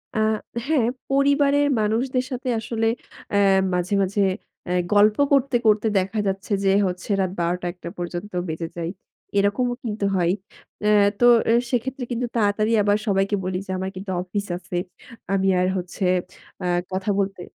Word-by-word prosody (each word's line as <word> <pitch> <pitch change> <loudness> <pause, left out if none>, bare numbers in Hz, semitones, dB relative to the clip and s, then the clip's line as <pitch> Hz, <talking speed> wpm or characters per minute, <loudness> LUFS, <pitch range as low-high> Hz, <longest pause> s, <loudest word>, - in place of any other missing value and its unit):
আ - - +1 0.5
হ্যাঁ, 275 -8 +2 0.2
পরিবারের 280 +1 +3
মানুষদের 250 +4 0
সাথে 255 +1 -3
আসলে 225 0 -1 0.4
অ্যা 200 - +3 0.3
মাঝে, 180 +2 -1
মাঝে 200 +2 0 0.4
অ্যা 180 - -2 0.2
গল্প 210 +1 +5
করতে, 275 -2 +3
করতে 215 +1 +4
দেখা 195 +3 0
যাচ্ছে 195 +3 -3
যে 195 - +4 0.2
হচ্ছে, 180 +3 -6
রাত 185 -1 0
১২ঃ০০-০১ঃ০০ 175 0 -2
পর্যন্ত 175 +3 -5 0.2
বেজে 160 +1 -3
যায়, 170 +1 -3 0.5
এরকমও 245 +5 +1
কিন্তু 210 -2 -2
হয়। 175 -1 +2 0.5
অ্যা 210 - +3 0.3
তো 240 - +4 0.3
এ - - +5 0.2
সেক্ষেত্রে 255 +2 -1
কিন্তু 240 +1 -1
তাড়াতাড়ি 215 0 +2
আবার 205 0 +3
সবাইকে 195 +1 +2
বলি 185 0 -2
যে, 190 - -6
"আমার 190 +1 -3
কিন্তু 190 0 -6
অফিস 200 +3 -3
আছে। 180 0 -5 0.6
আমি 195 0 +2
আর 180 - +2
হচ্ছে, 180 +1 -3 0.6
আ - - -2 0.3
কথা 190 +2 -2
বলতে" 195 -2 -2
205 Hz, 155 wpm, -23 LUFS, 185-230 Hz, 0.6 s, গল্প